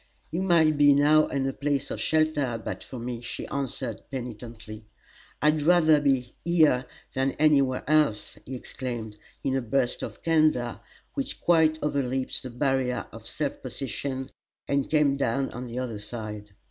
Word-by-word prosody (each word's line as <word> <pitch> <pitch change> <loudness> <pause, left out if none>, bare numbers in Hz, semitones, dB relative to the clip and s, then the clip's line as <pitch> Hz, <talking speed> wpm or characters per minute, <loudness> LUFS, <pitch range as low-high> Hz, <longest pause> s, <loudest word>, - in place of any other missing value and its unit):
"You 170 +4 -1
might 160 -5 +4
be 145 -1 +7
now 150 +2 +5
in 135 -1 -1
a 135 - -1
place 140 -1 -1
of - - -4
shelter 150 -6 +1
but - - -4
for 130 - -9
me," 120 0 -5
she 120 - -6
answered, 130 -4 -3
penitently. 115 -3 -7 0.6
"I'd 150 0 +4
rather 160 -2 +5
be 135 -4 +1
here 155 -7 +3 0.3
than 135 +1 +1
any 150 -2 +4
where 130 -2 -2
else!" 150 -8 +2
he 130 - -5
exclaimed, 120 -4 -5 0.3
in 135 - 0
a 135 - +1
burst 125 +2 0
of - - -7
candor 155 -7 +2 0.3
which 275 -2 -4
quite 160 -2 +4
overleaped 135 -3 0
the 130 - -7
barrier 125 -1 0
of 115 0 -10
self 145 -3 -3
possession 130 +1 -4 0.4
and 140 -1 0
came 150 -3 +3
down 135 0 0
on 125 +1 -6
the 120 +1 -6
other 120 -5 -3
side. 105 -1 -7
135 Hz, 160 wpm, -27 LUFS, 120-150 Hz, 0.6 s, be